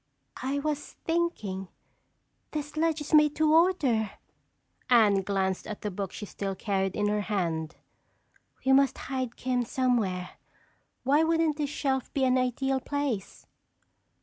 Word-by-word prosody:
"I 270 +2 -1
was 295 0 -3
thinking—this 295 - -5
ledge 320 0 +1
is 295 - -6
made 300 -1 +6
to 310 0 +3
order!" 295 - +3 0.8
Anne 215 -5 +5
glanced 190 -1 -1
at 215 -1 -6
the 210 - -3
book 195 0 -4
she 210 - -7
still 195 -1 -4
carried 195 -1 -1
in 205 - 0
her 210 0 +1
hand. 170 -6 -2 0.9
"We 265 - +4
must 275 0 +4
hide 260 -3 -4
'Kim' 250 -1 0
somewhere. 235 -8 -1 0.7
Why 280 +4 +4
wouldn't 325 -2 +2
this 295 -2 -1
shelf 265 -3 -1
be 275 - +2
an 255 0 +3
ideal 265 +2 0
place?" 275 -8 -3
255 Hz, 135 wpm, -28 LUFS, 205-295 Hz, 0.9 s, made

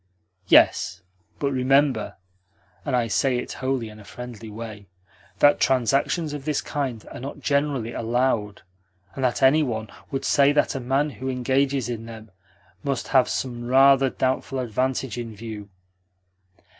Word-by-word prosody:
"Yes, 95 +1 +4 0.3
but 140 -1 -1
remember 135 -2 +2 0.7
(and - - 0
I 120 -2 +2
say 125 +3 +1
it 125 - -4
wholly 130 -3 -1
in 110 0 -12
a - - -12
friendly 115 0 -9
way) 105 -2 -8 0.5
that 145 +6 +5
transactions 135 - +1
of 145 -2 -6
this 150 -1 0
kind 130 -7 -4
are - - -8
not 135 +3 -7
generally 140 -5 0
allowed, 115 -3 -1 0.5
and 135 - -5
that 125 +1 0
any 140 +4 +6
one 110 -6 -3 0.2
would 135 - -3
say 140 0 +4
that 145 - +2
a 135 - -3
man 135 +4 0
who 130 -1 -5
engages 130 +1 0
in 115 -2 -5
them 110 -2 -11 0.5
must 140 -3 -2
have 130 -2 +4
some 120 -2 -3
rather 135 +1 +5
doubtful 130 +1 -1
advantage 130 +1 -2
in 115 -2 -6
view." 105 -1 -8
130 Hz, 150 wpm, -24 LUFS, 115-135 Hz, 0.7 s, any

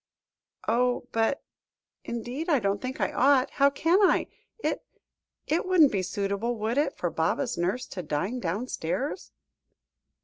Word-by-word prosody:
"Oh! 245 +1 +2
but 225 +5 +1 0.6
indeed 245 +8 -4
I 300 - +5
don't 200 -3 0
think 255 +1 -5
I - - 0
ought; 265 0 +3
how 280 0 +4
can 330 +6 +2
I? 390 - +4 0.3
It - - -2 0.6
it 325 +3 +1
wouldn't 340 -7 +6
be 195 - 0
suitable, 200 +5 -2
would 225 +4 0
it, 295 - 0
for - - -1
Baba's 255 -3 0
nurse 185 +9 -1
to 185 - -5
dine 175 +10 -2
downstairs?" 220 - -3
245 Hz, 140 wpm, -27 LUFS, 200-280 Hz, 0.6 s, wouldn't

